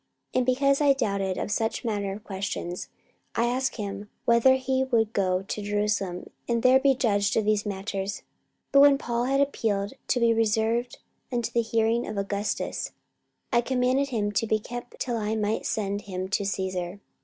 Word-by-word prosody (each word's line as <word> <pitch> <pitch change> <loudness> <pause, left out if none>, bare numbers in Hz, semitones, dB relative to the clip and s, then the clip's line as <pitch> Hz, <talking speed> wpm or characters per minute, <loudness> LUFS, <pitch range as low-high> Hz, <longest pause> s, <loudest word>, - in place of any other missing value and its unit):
44:025:020 - - 0
And 250 - +1
because 275 +2 +3
I 285 -1 +6
doubted 200 -7 -1
of - - -3
such 225 +2 -1
manner 205 -3 -1
of 205 +2 -7
questions, 190 -3 -4 0.5
I 235 - +2
asked 255 +2 0
him 205 -1 -5 0.2
whether 235 +3 +5
he 260 0 0
would 230 -4 +1
go 185 -1 +1
to 205 +2 -4
Jerusalem, 205 -3 -1 0.2
and 235 -1 +1
there 260 +1 +6
be 270 0 +4
judged 205 -5 +1
of 220 - +2
these 210 0 +1
matters. 195 0 -3
44:025:021 - - -35 0.5
But 275 - +6
when 280 0 +7
Paul 240 -3 -1
had 275 +2 +2
appealed 210 -7 0
to 250 - +2
be 235 -1 +4
reserved 225 +2 +1 0.3
unto 240 -2 -1
the 235 - +2
hearing 230 +1 +1
of 215 - -5
Augustus, 200 +1 -2 0.6
I 235 - +5
commanded 260 +2 +1
him 210 -5 -1
to 215 +2 0
be 215 - +3
kept 240 +3 -8
till 240 -2 -1
I 215 0 -1
might 215 0 -1
send 205 -1 -1
him 185 -2 -5
to 200 0 0
Caesar. 185 -1 -3
220 Hz, 185 wpm, -26 LUFS, 200-245 Hz, 0.6 s, when